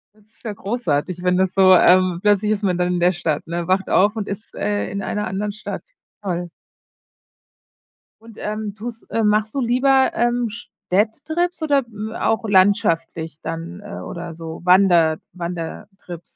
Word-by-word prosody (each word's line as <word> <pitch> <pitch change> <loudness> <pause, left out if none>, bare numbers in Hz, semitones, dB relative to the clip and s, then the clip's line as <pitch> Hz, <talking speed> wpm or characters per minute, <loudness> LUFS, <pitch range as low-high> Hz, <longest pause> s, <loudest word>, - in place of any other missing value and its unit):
Das 215 -1 -26
ist 220 - -27
ja 225 - -3
großartig, 185 -5 -2
wenn 180 0 +2
das 190 0 +1
so 190 -1 +6
ähm, 185 0 +5
plötzlich 210 +1 +3
ist 215 0 -1
man 185 -3 +1
dann 180 0 +1
in - - -1
der 175 +1 +3
Stadt, 160 -3 -2
ne, 170 0 -3
wacht 190 +1 +1
auf 205 +3 +3
und 210 - -3
ist, 200 +2 -7
äh, 205 0 -1
in 200 - -3
einer 210 0 -2
anderen 205 +2 -3
Stadt. 215 - -6 0.4
Toll. 175 -3 -3 1.7
Und, 225 -1 -15
ähm, 210 -1 -4
tust 230 +1 -8
äh, 225 - 0
machst 215 +2 +1
du 275 - 0
lieber, 260 +2 +3
ähm, 240 0 +1
Städtetrips 290 - -2
oder 285 -3 +3 0.4
auch 225 0 0
landschaftlich 165 -5 +2
dann, 165 +3 -6
äh 205 0 -8
oder 170 -1 -7
so 165 0 -8
Wander 175 -3 +5 0.2
Wandertrips? 175 +1 -7
195 Hz, 160 wpm, -21 LUFS, 175-215 Hz, 1.7 s, so